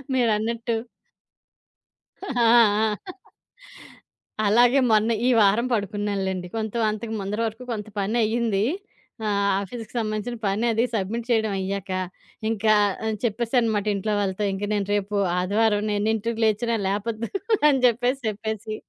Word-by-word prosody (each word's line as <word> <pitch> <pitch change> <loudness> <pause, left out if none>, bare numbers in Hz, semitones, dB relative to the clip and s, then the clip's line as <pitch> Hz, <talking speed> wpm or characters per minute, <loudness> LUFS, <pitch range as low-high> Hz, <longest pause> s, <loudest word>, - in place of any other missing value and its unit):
మీరన్నట్టు. 230 0 0 1.5
ఆ! - - -6 0.2
ఆ! - - +4 2.0
అలాగే 240 +5 +5
మొన్న 215 +1 +3 0.2
ఈ - - +4
వారం 210 +4 +4
పడుకున్నానులెండి. 200 -3 -2
కొంత 220 -2 -3 0.2
అంతకు 220 +1 -5
ముందర 200 +3 -3
వరకు 225 +3 -7
కొంత 210 -1 -5
పనయ్యింది. 220 0 +1 0.6
ఆహ్, 200 -1 +1
ఆఫీస్‌కి 225 +3 -8
సంబంధించిన 215 +2 -3
పనది 225 +4 +1
సబ్మిట్ 225 +3 -2
చేయడం 220 -3 +2
అయ్యాక, 195 0 -4 0.6
ఇంకా 215 -1 +2 0.5
చెప్పేసానమాట 230 -2 +1
ఇంట్లో 210 +2 -1
వాళ్ళతో. 195 0 -1
ఇంక 195 +1 -5
నేను 200 -2 -1
రేపు 205 0 -2 0.2
ఆదివారం, 205 +3 +1
నేనెన్నింటికి 220 +2 -1
లేచినా 220 +2 +1
లేపొద్దు 215 +3 -2 0.4
అని 280 -3 +4
చెప్పేసి, 245 +2 +2
చెప్పేసి, 215 0 -4
215 Hz, 110 wpm, -24 LUFS, 205-230 Hz, 2.0 s, అలాగే